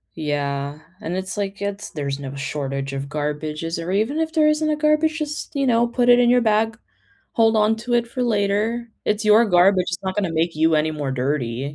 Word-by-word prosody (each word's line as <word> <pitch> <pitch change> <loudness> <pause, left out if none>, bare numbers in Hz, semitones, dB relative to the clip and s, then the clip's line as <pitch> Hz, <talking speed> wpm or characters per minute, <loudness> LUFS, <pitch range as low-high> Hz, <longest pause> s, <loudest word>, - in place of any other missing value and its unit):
Yeah, 145 -2 -3 0.2
and 175 -2 -4
it's 190 +2 -4
like 200 0 -4
it's 200 +1 -4
there's 140 -2 -4
no 140 0 -7
shortage 140 -1 -4
of 135 0 -4
garbages 150 +2 -3
or 180 - -4
even 225 +10 0
if 320 0 -1
there 310 -2 +4
isn't 305 0 +1
a 305 - +1
garbage, 305 +1 +1
just, 300 -1 -5
you 275 - +1
know, 235 0 +3
put 245 0 +1
it 245 - +7
in 240 -1 +4
your 245 0 +4
bag. 220 0 +1 0.6
Hold 225 -1 +3
on 215 +1 +3
to 240 +2 -3
it 235 0 +2
for 250 +2 -4
later, 225 +1 0
it's 210 +1 0
your 215 +2 +6
garbage, 185 0 +4
it's 175 +1 -4
not 190 0 -3
gonna 190 -5 -1
make 165 +1 0
you 160 +1 +2
any 155 +1 +2
more 145 -3 -3
dirty, 130 0 -2
200 Hz, 215 wpm, -22 LUFS, 150-235 Hz, 0.6 s, it